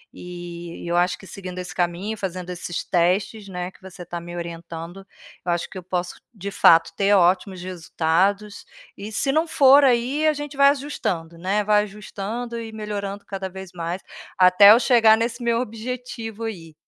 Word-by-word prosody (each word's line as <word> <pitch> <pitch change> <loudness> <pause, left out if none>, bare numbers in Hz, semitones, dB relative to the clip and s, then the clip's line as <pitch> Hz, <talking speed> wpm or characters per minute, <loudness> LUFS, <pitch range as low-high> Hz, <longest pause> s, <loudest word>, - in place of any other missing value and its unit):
eh, - - -14
e 175 -1 -8
eu 170 - 0
acho 175 +1 +2
que 190 - -14
seguindo 185 -2 -7
esse 180 -3 -7
caminho, 180 +5 -2
fazendo 185 -2 -5
esses 175 -1 -4
testes, 190 +4 0
né, 180 -1 -5
que - - -23
você 190 -1 -11
está 175 0 -6
me 175 +1 -9
orientando, 170 +2 -7 0.4
eu 175 - 0
acho 170 0 -2
que - - -10
eu 185 - -7
posso, 180 0 -4
de 200 -2 -6
fato, 165 -4 +5
ter 200 +2 +2
ótimos 185 0 +2
resultados, 185 +3 -1 0.3
e, 205 +2 -7
se 270 +5 0
não 315 +4 +1
for 280 -1 +6
aí, 260 +4 +2
a 310 - +4
gente 290 -1 -7
vai 280 0 +7
ajustando, 190 - -3
né, 195 +5 0
vai 210 0 +3
ajustando 210 +3 -6
e 225 -1 -7
melhorando 205 -2 -5
cada 195 -1 -5
vez 190 0 -9
mais, 170 +2 -4 0.4
até 185 +3 +8
eu 225 - +7
chegar 230 -4 +5
nesse 235 +2 -2
meu 235 -1 +1
objetivo 230 -1 -6
aí. 170 -8 -7
195 Hz, 180 wpm, -23 LUFS, 175-225 Hz, 0.4 s, até